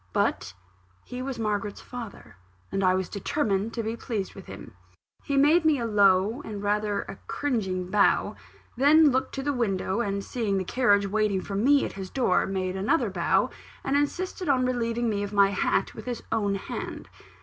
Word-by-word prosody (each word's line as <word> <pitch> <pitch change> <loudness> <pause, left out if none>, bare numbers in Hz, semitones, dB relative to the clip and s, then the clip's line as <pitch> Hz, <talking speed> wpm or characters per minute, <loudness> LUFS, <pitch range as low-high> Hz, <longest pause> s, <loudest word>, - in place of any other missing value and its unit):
But - - 0 0.5
he 250 0 -6
was 265 0 -4
Margaret's 205 -2 -2
father; 240 -4 -9 0.4
and 195 - -1
I 185 0 +4
was 185 -1 -1
determined 205 -1 -1
to 230 - -2
be 220 +1 -2
pleased 220 -5 -4
with 195 - -12
him. 115 - -10 0.5
He 280 - -1
made 305 +5 +5
me 310 -2 +4
a 235 - -2
low 205 +2 +3
and 205 -2 -6
rather 205 0 0
a 195 - -10
cringing 190 -10 -2
bow 205 -1 +3 0.4
then 295 +4 +6
looked 260 +1 -1
to 270 - -3
the 285 +1 0
window, 200 -4 -1
and 200 -3 -2
seeing 215 -5 -1
the 190 - 0
carriage 205 -1 +2
waiting 205 -1 0
for 200 - -7
me 275 +8 +3
at - - -6
his 190 -1 -7
door, 240 -9 +1
made 185 -1 -2
another 195 +11 +1
bow, - - +1 0.3
and 270 - 0
insisted 350 +4 -1
on 255 -2 +3
relieving 240 -1 -1
me 205 -2 0
of 205 0 -4
my 200 -1 +5
hat 195 0 0
with 220 - -10
his 245 -2 -4
own 205 -3 +1
hand. 195 - -6
215 Hz, 185 wpm, -26 LUFS, 195-255 Hz, 0.5 s, then